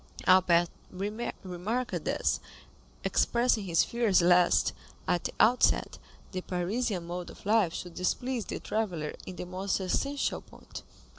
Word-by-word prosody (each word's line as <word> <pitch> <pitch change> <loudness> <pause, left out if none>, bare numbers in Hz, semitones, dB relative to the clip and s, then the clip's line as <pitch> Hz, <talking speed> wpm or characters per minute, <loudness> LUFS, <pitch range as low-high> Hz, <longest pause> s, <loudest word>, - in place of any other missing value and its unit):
Albert 180 -2 +5 0.2
remarked 205 +2 -4
this, - - 0 0.6
expressing 235 -3 +2
his 170 -2 +3
fears 230 -5 +2
lest, 175 0 +4 0.3
at 175 - 0
the - - -2
outset, 245 +3 +3 0.3
the 185 - -3
Parisian 185 +2 -2
mode 175 +1 -5
of - - -14
life 210 -4 +3
should 175 +1 -6
displease 245 +6 -1
the - - -5
traveller 180 -9 -2
in 185 - -6
the - - -5
most 185 +3 -2
essential 275 +10 -1
point. - - -11
185 Hz, 130 wpm, -29 LUFS, 180-225 Hz, 0.6 s, Albert